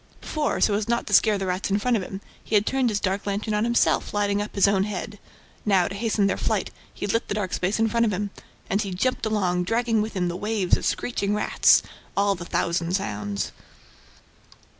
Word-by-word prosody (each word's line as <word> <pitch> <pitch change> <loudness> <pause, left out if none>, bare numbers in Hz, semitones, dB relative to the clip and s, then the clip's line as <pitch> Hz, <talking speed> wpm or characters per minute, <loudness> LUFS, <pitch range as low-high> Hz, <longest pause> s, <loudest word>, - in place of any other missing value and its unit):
Before, 305 -2 -2
so 210 - +3
as 205 +1 -1
not 235 0 0
to - - -5
scare 215 -2 +5
the 195 - -3
rats 185 +1 -2
in 200 - +2
front 245 +3 +1
of 215 - 0
him, 190 +1 -7 0.2
he 215 - -1
had 205 0 +4
turned 265 -2 +1
his 210 -2 0
dark 195 +1 -2
lantern 205 +2 -2
on 210 +1 +1
himself, 235 -2 +1
lighting 205 0 +1
up 210 - -6
his 200 0 +5
own 195 -1 +2
head; 205 0 -5 0.4
now, 190 -4 +3
to - - -6
hasten 210 0 0
their 195 - +1
flight, - - -1 0.2
he - - -5
lit 230 +3 0
the - - -2
dark 195 -4 -2
space 185 +3 0
in 225 0 +2
front 230 +1 +2
of - - 0
him. 200 +1 -2 0.4
And 200 +2 +1
he 195 -4 -4
jumped 255 +3 0
along, 180 -5 0
dragging 225 +1 +1
with 215 +1 -3
him 180 -2 0
the 175 - -3
waves 205 -1 +1
of - - -2
scratching 205 -4 -1
rats, 210 - +4 0.3
all 200 0 +3
the 175 -2 -7
thousand 170 0 -1
sounds. 105 - -3
205 Hz, 225 wpm, -25 LUFS, 190-220 Hz, 0.4 s, scare